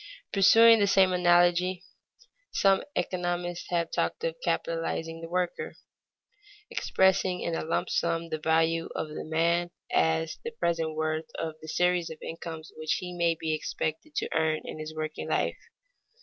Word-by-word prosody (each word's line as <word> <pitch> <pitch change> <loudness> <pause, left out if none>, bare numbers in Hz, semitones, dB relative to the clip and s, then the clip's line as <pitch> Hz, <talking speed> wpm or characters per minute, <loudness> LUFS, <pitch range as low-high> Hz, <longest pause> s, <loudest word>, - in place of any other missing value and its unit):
Pursuing 225 +3 +7
the 200 - +3
same 190 -1 +4
analogy 175 +1 +3 0.7
some 195 -1 +3
economists 175 -1 -2
have 170 -1 0
talked 455 - -1
of - - -1
capitalizing 165 - -2
the 165 - -7
worker, 180 0 -2 1.0
expressing 190 -1 +2
in 170 - -2
a - - -2
lump 160 - -1
sum 165 0 -1
the 155 -1 -3
value 165 +1 +1
of 155 - -3
the 150 - -6
man 170 +2 +1 0.2
as 160 0 +1
the 465 - -3
present 165 - -1
worth 155 0 -2
of 160 -1 -3
the 160 - -10
series 180 +1 +1
of 160 - -8
incomes 165 -1 -7
which 155 0 -1
he 180 -1 -4
may 170 -1 +2
be 160 -1 -1
expected 155 - -4
to - - 0
earn 160 -1 +1
in - - -7
his 155 0 -5
working 155 0 -4
life. - - 0
170 Hz, 155 wpm, -28 LUFS, 160-180 Hz, 1.0 s, Pursuing